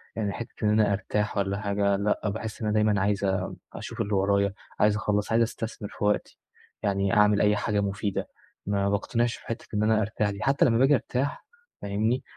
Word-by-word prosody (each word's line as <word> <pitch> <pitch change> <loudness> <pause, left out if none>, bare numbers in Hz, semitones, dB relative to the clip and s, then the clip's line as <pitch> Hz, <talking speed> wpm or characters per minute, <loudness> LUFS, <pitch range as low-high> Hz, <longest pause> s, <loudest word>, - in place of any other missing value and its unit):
يعني 105 -3 -1
حِتّة 115 -1 -8
إن 105 - +3
أنا 105 -1 +3
أرتاح 105 +2 -1
والّا 100 0 0
حاجة، 100 -1 +1
لأ 105 +1 0
باحس 110 +2 -5
إن 110 - -1
أنا 105 - +1
دايمًا 105 -2 +3
عايز 100 0 +1 0.5
أشوف - - -5
اللي 105 - -2
ورايا، 100 0 +2 0.3
عايز 105 0 +4
أخلّص، 105 -1 -1
عايز 115 +1 +4
أستثمر 110 -2 -5
في - - -4
وقتي، 105 0 0 0.4
يعني 100 0 +1
أعمل 105 -1 +4
أي 105 0 +4
حاجة 105 0 0
مفيدة، 100 0 -2 0.4
ما 100 0 +1
باقتنعش 115 +4 0
في - - -16
حِتّة 115 - -4
إن 105 0 +1
أنا 110 0 +3
أرتاح 105 0 0
دي 100 -1 -5
حتى 135 +1 +3
لما 115 -2 +3
باجي 135 +4 +5
أرتاح 135 - -2 0.4
فاهمني، 110 +6 0
105 Hz, 195 wpm, -27 LUFS, 100-110 Hz, 0.5 s, باجي